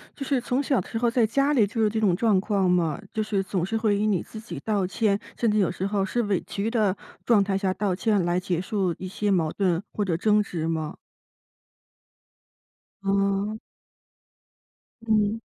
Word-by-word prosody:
就 275 Hz, -, -5 dB
是 270 Hz, -1 st, +1 dB
从 250 Hz, +3 st, -1 dB
小 270 Hz, -2 st, +2 dB
的 180 Hz, -, -6 dB
时 -, -, -3 dB
候 235 Hz, +1 st, +2 dB
在 230 Hz, -2 st, +3 dB
家 275 Hz, +6 st, +2 dB
里 235 Hz, -8 st, +4 dB
就 225 Hz, +2 st, -2 dB
有 215 Hz, -, +4 dB
这 220 Hz, +1 st, -2 dB
种 200 Hz, -5 st, +3 dB
状 210 Hz, 0 st, +3 dB
况 195 Hz, -2 st, +1 dB
吗？ 170 Hz, -1 st, +1 dB
就 220 Hz, -, -1 dB
是 210 Hz, -2 st, -1 dB
总 190 Hz, -3 st, -1 dB
是 225 Hz, +4 st, -3 dB
会 215 Hz, -2 st, +1 dB
以 210 Hz, +1 st, +1 dB
你 195 Hz, -5 st, +1 dB
自 220 Hz, -, -10 dB
己 195 Hz, -9 st, -7 dB
道 200 Hz, 0 st, 0 dB
歉， 200 Hz, +2 st, +1 dB, 0.2 s
甚 230 Hz, -2 st, +2 dB
至 210 Hz, -, +1 dB
有 195 Hz, -4 st, +3 dB
时 185 Hz, +1 st, -3 dB
候 200 Hz, -1 st, 0 dB
是 240 Hz, +5 st, -1 dB
委 200 Hz, -4 st, 0 dB
屈 205 Hz, +3 st, -2 dB
的 215 Hz, -5 st, +2 dB, 0.3 s
状 220 Hz, -4 st, +5 dB
态 195 Hz, -1 st, 0 dB
下 195 Hz, -1 st, 0 dB
道 195 Hz, -1 st, -1 dB
歉 205 Hz, 0 st, +1 dB
来 175 Hz, +1 st, +1 dB
结 180 Hz, -2 st, -2 dB
束 185 Hz, -3 st, -1 dB
一 185 Hz, -, -6 dB
些 205 Hz, +2 st, -2 dB
矛 170 Hz, -5 st, +2 dB
盾 180 Hz, -4 st, 0 dB
或 205 Hz, -, -1 dB
者 175 Hz, -4 st, 0 dB
争 210 Hz, +5 st, +3 dB
执 165 Hz, -5 st, -3 dB
吗？ 160 Hz, -2 st, -2 dB, 2.1 s
哦。 200 Hz, +2 st, 0 dB, 1.4 s
嗯。 220 Hz, -1 st, +1 dB
200 Hz, 215 characters per minute, -25 LUFS, 185-220 Hz, 2.1 s, 状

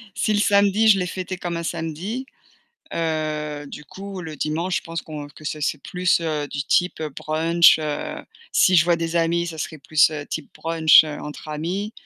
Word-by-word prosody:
Si 215 Hz, -, +1 dB
le 205 Hz, -, +2 dB
samedi, 205 Hz, +1 st, +4 dB
je 200 Hz, -3 st, +6 dB
l'ai 180 Hz, -, -1 dB
fêté 185 Hz, +1 st, -5 dB
comme 175 Hz, -1 st, -4 dB
un 170 Hz, -, -4 dB
samedi, 170 Hz, -, -4 dB, 0.7 s
heu, 155 Hz, -2 st, -2 dB
du 150 Hz, +1 st, -9 dB
coup 195 Hz, +5 st, -8 dB
le 160 Hz, -3 st, -7 dB
dimanche 165 Hz, +5 st, -1 dB
je -, -, -2 dB
pense 165 Hz, -1 st, -5 dB
qu'on 150 Hz, -2 st, -7 dB
que 155 Hz, -, -16 dB
ça 150 Hz, 0 st, -4 dB
c'est 150 Hz, -, 0 dB
plus 180 Hz, 0 st, +1 dB, 0.3 s
du 140 Hz, -, -3 dB
type 180 Hz, +1 st, +1 dB
brunch, 165 Hz, +2 st, +4 dB
heu, 150 Hz, -2 st, -4 dB, 0.3 s
si 185 Hz, -1 st, +5 dB
je 155 Hz, -, +6 dB
vois 175 Hz, -1 st, +3 dB
des 165 Hz, 0 st, -2 dB
amis, 170 Hz, +1 st, +1 dB
ça 160 Hz, -1 st, -7 dB
serait 155 Hz, +1 st, -5 dB
plus 155 Hz, +3 st, +3 dB, 0.2 s
type 155 Hz, -, -5 dB
brunch 160 Hz, -1 st, +5 dB
entre 150 Hz, 0 st, -7 dB
amis 180 Hz, +8 st, -3 dB
165 Hz, 185 wpm, -22 LUFS, 155-180 Hz, 0.7 s, je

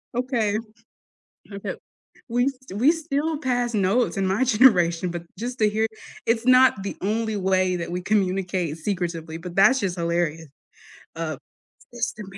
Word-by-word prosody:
Okay. 235 Hz, -5 st, 0 dB, 1.0 s
Okay. 200 Hz, -, -5 dB, 0.5 s
We 245 Hz, +3 st, +2 dB
st 260 Hz, -7 st, -8 dB
we 290 Hz, +7 st, +6 dB
still 315 Hz, -1 st, -2 dB
pass 245 Hz, -4 st, -1 dB
notes 210 Hz, +5 st, +1 dB
in 195 Hz, -1 st, 0 dB
my 195 Hz, +7 st, +1 dB
generation, 185 Hz, -8 st, +4 dB
but 170 Hz, 0 st, -6 dB
just 245 Hz, +2 st, -4 dB
to 215 Hz, -, +5 dB
hear 220 Hz, +1 st, +1 dB, 0.4 s
it's 230 Hz, +1 st, +1 dB
not 255 Hz, -6 st, +5 dB
the 195 Hz, -, -4 dB
only 220 Hz, +2 st, -1 dB
way 185 Hz, -1 st, +1 dB
that 170 Hz, 0 st, -5 dB
we 180 Hz, -, -2 dB
communicate 185 Hz, -5 st, 0 dB
secretively, 165 Hz, -3 st, -3 dB
but 175 Hz, +1 st, -8 dB
that's 260 Hz, +6 st, +5 dB
just 185 Hz, -3 st, -2 dB
hilariou 170 Hz, -1 st, -1 dB, 0.7 s
uh, 155 Hz, -4 st, -3 dB, 0.6 s
"Sister 230 Hz, -3 st, -3 dB
205 Hz, 145 wpm, -24 LUFS, 180-245 Hz, 1.0 s, we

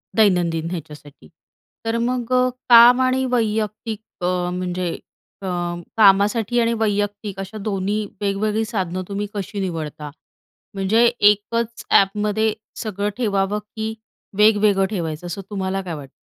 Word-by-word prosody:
दैनंदिन 175 Hz, -6 st, +2 dB
ह्याच्यासाठी. 150 Hz, -, -9 dB, 0.6 s
तर 225 Hz, +1 st, 0 dB
मग 250 Hz, -1 st, -2 dB, 0.4 s
काम 240 Hz, +2 st, +8 dB
आणि 260 Hz, +1 st, +2 dB
वैयक्तिक 215 Hz, -1 st, -1 dB, 0.2 s
अ, 180 Hz, 0 st, 0 dB
म्हणजे 180 Hz, -1 st, -2 dB, 0.5 s
अ, 190 Hz, -, -5 dB, 0.5 s
कामासाठी 210 Hz, +3 st, +4 dB
आणि 230 Hz, 0 st, +2 dB
वैयक्तिक 205 Hz, -2 st, -1 dB
अशा 195 Hz, +3 st, -6 dB
दोन्ही 200 Hz, +1 st, -1 dB, 0.2 s
वेगवेगळी 210 Hz, +2 st, 0 dB
साधनं 185 Hz, -4 st, -3 dB
तुम्ही 205 Hz, +1 st, -3 dB
कशी 205 Hz, 0 st, -5 dB
निवडता? 155 Hz, -5 st, -4 dB, 0.6 s
म्हणजे 200 Hz, +5 st, +3 dB, 0.3 s
एकच 230 Hz, +3 st, -3 dB, 0.2 s
एपमध्ये 210 Hz, +2 st, 0 dB, 0.3 s
सगळं 205 Hz, -1 st, -2 dB
ठेवावं 205 Hz, -3 st, 0 dB
की 220 Hz, +1 st, -6 dB, 0.4 s
वेगवेगळं 210 Hz, -2 st, +4 dB
ठेवायचं 170 Hz, -4 st, -4 dB
असं 185 Hz, +3 st, -5 dB
तुम्हाला 195 Hz, -1 st, -2 dB
काय 175 Hz, -3 st, -6 dB
वाटतं? 140 Hz, -2 st, -9 dB
205 Hz, 120 wpm, -21 LUFS, 185-220 Hz, 0.6 s, काम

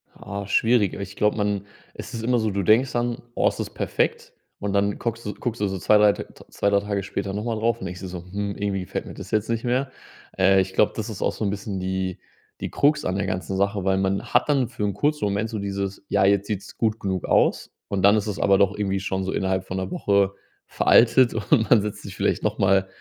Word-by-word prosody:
Ah, 100 Hz, 0 st, -6 dB
schwierig, 110 Hz, 0 st, +2 dB
aber -, -, -6 dB
ich 100 Hz, 0 st, -7 dB
glaube, 105 Hz, 0 st, +1 dB
man 105 Hz, -1 st, -1 dB, 0.3 s
es -, -, -8 dB
ist 115 Hz, -1 st, -5 dB
immer 125 Hz, +1 st, +2 dB
so, 110 Hz, -1 st, 0 dB
du 100 Hz, 0 st, -1 dB
denkst 120 Hz, +7 st, +4 dB
dann: 120 Hz, 0 st, -1 dB, 0.2 s
„Oh, -, -, +3 dB
es -, -, -1 dB
ist -, -, -4 dB
perfekt.” -, -, -1 dB, 0.3 s
Und 105 Hz, -, -2 dB
dann 100 Hz, 0 st, +1 dB
guckst 115 Hz, 0 st, -3 dB
du 105 Hz, -, -3 dB
guckst 120 Hz, -2 st, -4 dB
du 105 Hz, -, +1 dB
so 95 Hz, 0 st, -3 dB
2, 105 Hz, +5 st, +4 dB
3 105 Hz, -1 st, +5 dB
T -, -, -6 dB, 0.3 s
2, 100 Hz, -, 0 dB
3 100 Hz, 0 st, +3 dB
Tage 100 Hz, -1 st, -2 dB
später 100 Hz, 0 st, -4 dB
nochmal 110 Hz, +2 st, -2 dB
drauf 115 Hz, +1 st, 0 dB
und -, -, -6 dB
denkst 90 Hz, 0 st, -6 dB
dir 95 Hz, -, -5 dB
so: 90 Hz, -1 st, -7 dB
„Hm, 100 Hz, 0 st, -3 dB
irgendwie 100 Hz, -1 st, -2 dB
gefällt 90 Hz, -, -5 dB
mir -, -, -9 dB
das -, -, -9 dB
jetzt 110 Hz, 0 st, 0 dB
nicht 115 Hz, -1 st, -1 dB
mehr.” 130 Hz, +2 st, 0 dB, 0.5 s
Äh, 95 Hz, 0 st, +5 dB
ich 95 Hz, 0 st, -4 dB
glaube, -, -, +3 dB
das -, -, -4 dB
ist -, -, -7 dB
auch -, -, +1 dB
so -, -, -5 dB
'n 100 Hz, -, +1 dB
bisschen 100 Hz, -1 st, -4 dB
die 95 Hz, 0 st, -3 dB, 0.4 s
die -, -, -3 dB
Krux 150 Hz, +1 st, +2 dB
an 95 Hz, -, -1 dB
der 100 Hz, -, -1 dB
ganzen 95 Hz, +1 st, -3 dB
Sache, 100 Hz, 0 st, 0 dB
weil 95 Hz, 0 st, +2 dB
man 95 Hz, 0 st, 0 dB
hat -, -, +4 dB
dann 140 Hz, -4 st, +2 dB
für 120 Hz, -3 st, -5 dB
'n 100 Hz, -1 st, 0 dB
kurzen 150 Hz, +2 st, 0 dB
Moment 100 Hz, +2 st, -1 dB
so 110 Hz, -, -4 dB
dieses 100 Hz, -1 st, -4 dB
„Ja, -, -, +3 dB
jetzt 100 Hz, 0 st, +3 dB
sieht's 105 Hz, -1 st, -5 dB
gut 110 Hz, -1 st, 0 dB
genug 95 Hz, -2 st, -2 dB
aus“ -, -, +2 dB, 0.2 s
und 95 Hz, -1 st, -2 dB
dann 100 Hz, +2 st, +7 dB
ist 110 Hz, -1 st, 0 dB
es 105 Hz, -, -3 dB
aber 100 Hz, -1 st, +4 dB
doch 100 Hz, 0 st, +2 dB
irgendwie 95 Hz, -2 st, -1 dB
schon 95 Hz, 0 st, -2 dB
so 95 Hz, -, -2 dB
innerhalb 95 Hz, 0 st, -1 dB
von 95 Hz, -, -5 dB
'ner 95 Hz, 0 st, -3 dB
Woche 100 Hz, -1 st, +2 dB, 0.3 s
veraltet 120 Hz, +1 st, +4 dB
und 110 Hz, +1 st, +1 dB
man 115 Hz, -, +6 dB
setzt 105 Hz, 0 st, -5 dB
sich -, -, -8 dB
vielleicht -, -, 0 dB
nochmal, 95 Hz, 0 st, +2 dB
100 Hz, 255 wpm, -24 LUFS, 95-110 Hz, 0.5 s, dann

